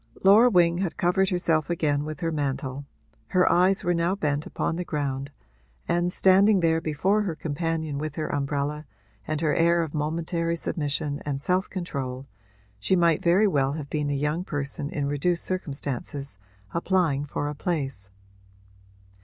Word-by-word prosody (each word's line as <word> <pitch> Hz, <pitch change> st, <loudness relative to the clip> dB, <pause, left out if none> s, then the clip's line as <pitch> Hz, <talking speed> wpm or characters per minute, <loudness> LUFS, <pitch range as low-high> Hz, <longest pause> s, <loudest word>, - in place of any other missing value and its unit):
Laura 210 Hz, +6 st, +7 dB
Wing 175 Hz, -4 st, +3 dB
had 185 Hz, -4 st, -2 dB
covered 185 Hz, +2 st, +2 dB
herself 165 Hz, -4 st, +1 dB
again 150 Hz, -4 st, +1 dB
with 155 Hz, -1 st, -6 dB
her 165 Hz, -1 st, 0 dB
mantle; 140 Hz, -2 st, -3 dB, 0.4 s
her 180 Hz, -1 st, +3 dB
eyes 185 Hz, +2 st, +3 dB
were 175 Hz, -, +2 dB
now 170 Hz, +2 st, +1 dB
bent 150 Hz, -5 st, -1 dB
upon -, -, -2 dB
the 180 Hz, -, -2 dB
ground 140 Hz, -4 st, -3 dB, 0.6 s
and, 175 Hz, +1 st, +1 dB
standing 195 Hz, +2 st, +5 dB
there 165 Hz, -1 st, +2 dB
before 185 Hz, +7 st, +1 dB
her 185 Hz, -6 st, -2 dB
companion 160 Hz, -1 st, -2 dB
with 155 Hz, -1 st, -4 dB
her 155 Hz, -, -2 dB
umbrella 145 Hz, +1 st, -2 dB, 0.4 s
and 155 Hz, 0 st, -2 dB
her 155 Hz, -2 st, +2 dB
air 170 Hz, +2 st, +3 dB
of 160 Hz, -, -6 dB
momentary 165 Hz, +2 st, -1 dB
submission 145 Hz, -2 st, -2 dB
and 140 Hz, -2 st, -3 dB
self 180 Hz, +6 st, 0 dB
control, 135 Hz, -8 st, -4 dB, 0.5 s
she 145 Hz, -, +2 dB
might 170 Hz, -3 st, +3 dB
very 185 Hz, +5 st, +4 dB
well 140 Hz, -6 st, +1 dB
have 145 Hz, -2 st, -6 dB
been 150 Hz, -1 st, -1 dB
a 145 Hz, -, 0 dB
young 150 Hz, +5 st, -1 dB
person 145 Hz, -3 st, -4 dB
in 145 Hz, -2 st, -2 dB
reduced 145 Hz, +5 st, 0 dB
circumstances 140 Hz, -, -3 dB, 0.3 s
applying 170 Hz, -5 st, +1 dB
for 145 Hz, 0 st, -3 dB
a 150 Hz, -, -3 dB
place. 135 Hz, -, -3 dB
155 Hz, 160 wpm, -26 LUFS, 145-175 Hz, 0.6 s, Laura